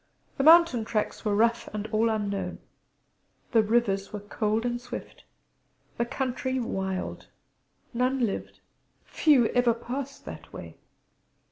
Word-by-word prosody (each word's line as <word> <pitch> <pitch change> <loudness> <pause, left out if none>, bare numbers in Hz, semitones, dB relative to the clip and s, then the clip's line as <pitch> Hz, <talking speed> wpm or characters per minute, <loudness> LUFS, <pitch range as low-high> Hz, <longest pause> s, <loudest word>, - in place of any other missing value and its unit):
The - - +2
mountain 320 -6 +7
tracks 215 -1 -2
were 210 -2 +1
rough 230 +2 +2
and 210 0 -3
all 225 +1 +2
unknown; 205 -2 -2 0.9
the 225 - +5
rivers 210 -3 +1
many, 205 -1 -7
cold 215 +1 0
and 240 0 -2
swift: - - -9 0.7
the 235 - +2
country 260 0 -2
wild; 190 -5 -3 0.7
none 250 +1 +1
lived, 200 - -5 0.4
few 285 -7 +4
ever 245 -2 +3
passed, 275 +4 -6
that - - -9
way. - - -9
235 Hz, 125 wpm, -27 LUFS, 215-255 Hz, 0.9 s, mountain